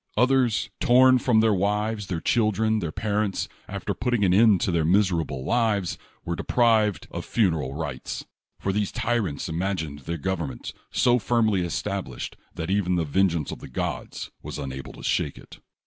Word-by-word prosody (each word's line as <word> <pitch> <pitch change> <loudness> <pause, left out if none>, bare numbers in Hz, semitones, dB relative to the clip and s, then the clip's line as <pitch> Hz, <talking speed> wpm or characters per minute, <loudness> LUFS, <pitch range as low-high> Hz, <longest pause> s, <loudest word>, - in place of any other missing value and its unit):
Others, 125 -4 +2
torn 130 +1 +6
from 120 -3 +3
their 110 -1 +4
wives, 105 +2 0
their 90 -2 -2
children, 110 +1 +2
their 85 -6 -3
parents, 105 +1 -1 0.2
after - - -3
putting 120 -3 0
an 90 - +3
end 105 -1 +6
to 105 - +1
their 85 -2 +1
miserable 85 -7 +1
lives, 110 -6 +1 0.3
were 85 - -2
deprived 110 -1 +2
of - - -4
funeral 80 - 0
rites; 75 -5 -5 0.3
for 95 - -1
these 105 -1 0
tyrants 110 -11 -1
imagined 80 -3 -2
their 85 +5 -4
government 80 -6 -3 0.2
so 125 0 +3
firmly 110 -3 +2
established 85 -7 -4 0.2
that 80 +3 -3
even 95 -2 +1
the 85 -2 +1
vengeance 85 -1 +1
of - - -7
the - - -10
gods - - -4
was - - -6
unable 65 -2 -6
to - - -12
shako 70 - -1
it. - - -15
100 Hz, 165 wpm, -25 LUFS, 85-110 Hz, 0.3 s, torn